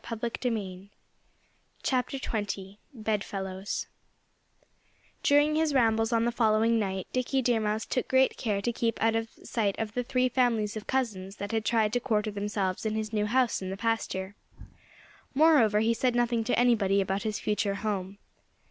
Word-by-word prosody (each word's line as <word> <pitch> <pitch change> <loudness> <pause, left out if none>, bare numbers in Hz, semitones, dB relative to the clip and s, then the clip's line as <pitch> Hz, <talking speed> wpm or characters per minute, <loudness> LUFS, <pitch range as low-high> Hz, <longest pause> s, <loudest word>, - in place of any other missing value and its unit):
XX 220 -5 -3 2.1
BEDFELLOWS 200 -3 -3 1.4
During 290 +1 +4
his 310 -2 +1
rambles 225 -2 +3
on 230 0 +2
the 240 - +1
following 225 0 +3
night 190 -3 -2
Dickie 255 +1 0
Deer 235 -2 +2
Mouse 215 0 -1
took 255 - -2
great 260 0 +3
care 205 -4 -2
to 240 - 0
keep 230 -1 -1
out 225 0 +2
of 225 0 -1
sight 205 -4 -1
of 215 -2 -3
the 250 - 0
three 255 +1 +1
families 230 -4 +1
of 215 - -7
cousins 205 -7 -2
that 200 -1 -5
had 225 -1 -1
tried 220 -2 +2
to 245 - +2
quarter 215 -4 0
themselves 200 -2 -2
in 220 -1 -1
his 220 0 -3
new 210 -1 +1
house 250 0 +1
in 190 - -4
the 190 - -4
pasture. 205 -3 -2 1.0
Moreover 265 -9 +5
he 225 +1 +3
said 245 +1 0
nothing 240 -1 +1
to 245 - +1
anybody 220 -5 +3
about 195 +1 -1
his 215 0 -2
future 210 -1 0
home. 200 -2 -3
220 Hz, 155 wpm, -28 LUFS, 205-240 Hz, 2.1 s, Moreover